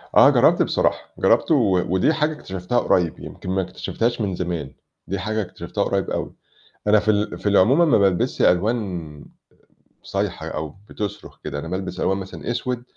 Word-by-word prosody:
آه، - - +8
جرّبت - - +4
بصراحة، - - 0
جرّبته - - +3
و 90 -2 +2
ودي 120 - +3
حاجة 155 0 0
اكتشفتها 95 - -2
قريب، 90 -7 +1
يمكن - - -9
ما 95 +1 +1
اكتشفتهاش 115 +5 -2
من 100 -3 -1
زمان، 85 -6 -4 0.3
دي 100 +1 -2
حاجة 110 +3 -1
اكتشفتها 95 - -4
قريب - - -1
أوي، - - -3 0.5
أنا 105 0 +5
في 110 - +1
ال 105 0 0
في 105 - -1
العموم 105 - +4
ما - - +5
بالبسش 95 -3 +1
ألوان 90 -7 0 0.8
صايحة - - -3
أو 75 -1 -5
بتصرخ 105 -2 -6
كده، 70 -1 -4
أنا 80 - -6
بالبس 95 +2 -4
ألوان 95 +1 +1
مثلًا 95 +5 -6
أسود، 120 0 -3
95 Hz, 165 wpm, -22 LUFS, 90-110 Hz, 0.8 s, آه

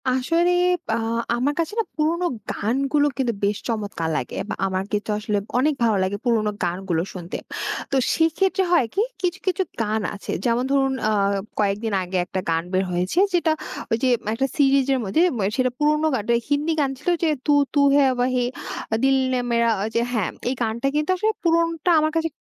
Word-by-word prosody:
আসলে 330 +8 +2 0.4
বা - - 0 0.4
আমার 260 +5 0
কাছে 330 +3 -1
না, - - +3
পুরোনো 330 +3 0 0.3
গানগুলো 275 +7 +1
কিন্তু 250 -4 0
বেশ 200 0 +1
চমৎকার 205 -7 -2
লাগে, 125 - -4
বা - - -2
আমার 190 0 -1
কিন্তু 210 0 -2
আসলে 210 -1 -1 0.2
অনেক 295 +4 +3
ভালো 220 -3 +3
লাগে 190 +2 -1
পুরোনো 220 -3 +2
গানগুলো 175 -1 -1
শুনতে। 175 -1 -6 0.5
তো - - +1 0.2
সেক্ষেত্রে 375 +4 +2
হয় 335 -8 +4
কি 400 - +1 0.2
কিছু, 350 -1 -1
কিছু 370 +1 +1 0.2
গান 220 0 0
আছে 200 - -6
যেমন 240 +1 +2
ধরুন, 270 -1 +2 0.2
আ - - +2 0.5
কয়েকদিন 210 +1 0
আগে, 185 +1 -3
একটা 185 - -3
গান 165 0 +1
বের 185 +1 +2
হয়েছে 180 - -2 0.2
যেটা 340 -2 +2 0.4
ওই 225 - +3
যে - - +4 0.3
একটা 265 +4 0
সিরিজের 275 -2 +3
মধ্যে 200 +12 +1 0.2
ম্যা 200 - 0
সেটা 255 -1 +2
পুরোনো 300 +1 +2
গান 220 - -2
টাই, 235 0 +4
হিন্দি 295 +3 +1
গান 275 - +1
ছিল, 295 - -2
যে, - - +4 0.2
"তু 295 - +4 0.2
তু 290 - +2 0.2
হ্যাঁ 275 -2 +5
ওয়াহি 250 0 +1 0.6
দিল 270 0 +4 0.2
ইয়ে 250 - +1
মেরা," 235 0 +3 0.3
যে 230 - +3
হ্যাঁ, 215 -7 0 0.2
এই - - 0
গানটা 235 +3 -1
কিন্তু 300 +2 0
আসলে 430 +4 +1
পুরোনোটা 335 0 +2
আমার 310 0 +1
কাছে 325 0 +1
255 Hz, 185 wpm, -23 LUFS, 210-305 Hz, 0.6 s, হ্যাঁ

